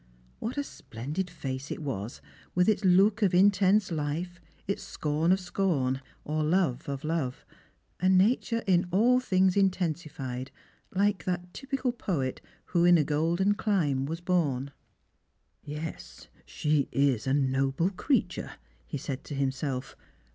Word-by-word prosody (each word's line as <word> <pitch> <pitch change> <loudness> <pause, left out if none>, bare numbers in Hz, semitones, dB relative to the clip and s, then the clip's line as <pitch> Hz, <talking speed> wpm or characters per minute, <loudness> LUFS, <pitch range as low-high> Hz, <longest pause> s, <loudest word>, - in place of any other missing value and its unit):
"What 235 +5 -4
a 285 - +1
splendid 150 - -5
face 135 -4 -5
it - - -5
was, 115 -5 -4 0.3
with 180 0 +3
ita 210 -2 +2
look 200 +5 +4
of 190 -4 +3
intense 195 +1 +4
hfe, 155 +3 -2 0.4
its 200 - -2
scorn 155 +3 0
of 190 - +4
scorn, 165 -8 0 0.2
or 155 +1 -1
love 155 -6 +1
of 140 -1 -4
love; 155 -5 -2 0.5
a 185 - +1
natui 220 +5 +3
e - - -15
in 175 +1 +3
all 235 +8 +4
thinfTs 185 -5 +2
intensified, 155 -9 -1 0.4
like 195 -3 +1
that 180 -1 -3
typical 270 -2 -2
poet 160 - -2 0.2
who 170 -1 +1
in 175 0 +7
a 155 - +3
golden 165 +7 +1
chnne 165 -11 0
was 165 +3 -4
born. 145 -7 0 0.5
" - - -46
Yes, 150 - -7 0.2
she 150 -2 0
is 135 -4 +1
a 130 - +2
noble 135 +5 +1
creature," 235 +5 -1 0.3
he - - -4
said 135 -1 -5
to 145 - -6
himself. 135 -1 -2
170 Hz, 145 wpm, -29 LUFS, 140-190 Hz, 0.5 s, in